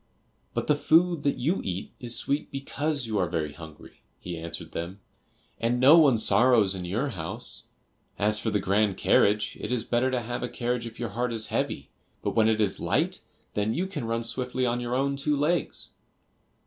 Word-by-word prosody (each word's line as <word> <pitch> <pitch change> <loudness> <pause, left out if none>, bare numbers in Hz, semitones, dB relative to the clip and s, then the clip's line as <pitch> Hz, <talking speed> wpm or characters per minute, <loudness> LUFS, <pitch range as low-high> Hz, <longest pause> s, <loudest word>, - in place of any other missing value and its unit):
"But - - -1
the 150 - +4
food 165 +2 +3
that 140 -1 0
you 160 +10 0
eat 95 0 -4
is 120 -1 -5
sweet 140 +2 -2
because 140 0 -2
you 110 -2 -1
are 90 - +1
very 80 -4 -2
hungry," 80 0 -13 0.2
he 90 -1 -6
answered 85 0 -7
them, 85 +4 -5 0.6
"and 120 +2 +1
no 135 +5 +8
one 140 -7 +5
sorrows 115 -3 +5
in 90 -2 -5
your 115 +11 -1
house. 80 -8 -4 0.5
As 105 +1 +2
for 110 - -1
the 105 - +1
grand 100 0 +1
carriage, 105 +1 +2
it - - -4
is 125 -3 0
better 120 +2 +1
to 130 -2 -1
have 120 +1 -4
a 125 - -3
carriage 120 -1 -2
if 115 0 -11
your 120 -2 -3
heart 120 +4 -2
is 110 -1 -3
heavy, - - -2 0.3
but - - 0
when 110 -1 +4
it 110 -1 +1
is 105 -3 +1
light, - - 0 0.3
then 105 +2 0
you 180 - 0
can 190 -10 -5
run 115 +1 -1
swiftly 125 +2 -1
on 120 0 0
your 120 0 -2
own 140 +1 0
two 145 +1 0
legs." 160 +5 -1
120 Hz, 200 wpm, -27 LUFS, 105-135 Hz, 0.6 s, no